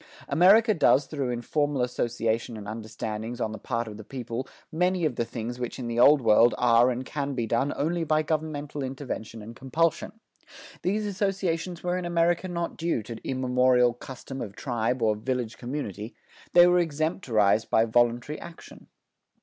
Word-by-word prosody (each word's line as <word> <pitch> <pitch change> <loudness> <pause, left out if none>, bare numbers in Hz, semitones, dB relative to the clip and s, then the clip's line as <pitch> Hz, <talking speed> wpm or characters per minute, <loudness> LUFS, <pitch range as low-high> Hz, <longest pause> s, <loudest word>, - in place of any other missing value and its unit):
America 215 +6 +5
does 145 -5 +4
through 140 -5 -3
informal 140 +2 -1
association 115 -2 -2
and 105 -1 -8
understandings 110 +1 -5
on 110 - -1
the 110 - -7
part 115 +2 -3
of 105 -1 -8
the 110 - -9
people 125 +1 -5 0.2
many 180 +1 +1
of 145 -6 0
the 120 - 0
things 120 +1 -6
which 125 -1 -4
in 125 - -5
the 120 0 -2
Old 140 +2 +6
World 115 +2 +5
are 120 0 +4
and 125 +1 -3
can 140 -1 -3
be 120 -2 -1
done 120 +5 0
only 165 +3 -1
by 155 0 +1
governmental 150 -2 -3
intervention 130 -5 -6
and 115 +2 -10
compulsion. 165 - -1 0.7
These 210 +4 0
associations 190 -4 -2
were 180 0 0
in 180 - -5
America 170 +1 +1
not 170 -1 -4
due 165 -9 -1
to 115 +2 -7
immemorial 125 -1 +2
custom 130 +2 -8
of 100 -3 -6
tribe 115 +2 -1
or 110 -1 +3
village 125 +1 -3
community. 120 -5 -5 0.4
They 175 0 +8
were 180 0 +4
extemporized 145 - +1
by 110 - +4
voluntary 120 +5 +1
action. 170 -1 -12
130 Hz, 165 wpm, -26 LUFS, 115-160 Hz, 0.7 s, They